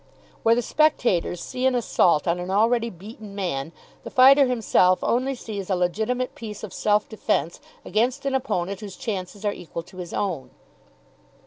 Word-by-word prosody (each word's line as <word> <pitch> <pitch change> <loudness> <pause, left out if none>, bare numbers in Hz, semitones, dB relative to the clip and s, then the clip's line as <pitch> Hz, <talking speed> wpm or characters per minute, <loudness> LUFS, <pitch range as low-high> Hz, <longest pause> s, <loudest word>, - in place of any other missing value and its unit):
Where 230 0 +4
the 245 - 0
spectators 240 - +1
see 255 0 -1
an 260 - +2
assault 180 -9 +2
on 170 +1 +1
an 180 +1 -5
already 230 +4 +2
beaten 205 +2 -11
man, 165 -7 -3 0.3
the - - -7
fighter 270 +2 +7
himself 205 -6 +3
only 260 +3 +1
sees 205 -5 -6
a 190 - +2
legitimate 220 +8 -1
piece 215 -2 -8
of 210 - -7
self 210 0 +1
defence 210 -7 -1 0.3
against 250 +6 0
an 275 - 0
opponent 200 -8 -1
whose 205 -3 -8
chances 205 -4 -5
are 205 - +1
equal 165 0 -7
to 180 - -16
his 175 -2 -7
own. 180 -10 -2
210 Hz, 165 wpm, -24 LUFS, 180-245 Hz, 0.3 s, fighter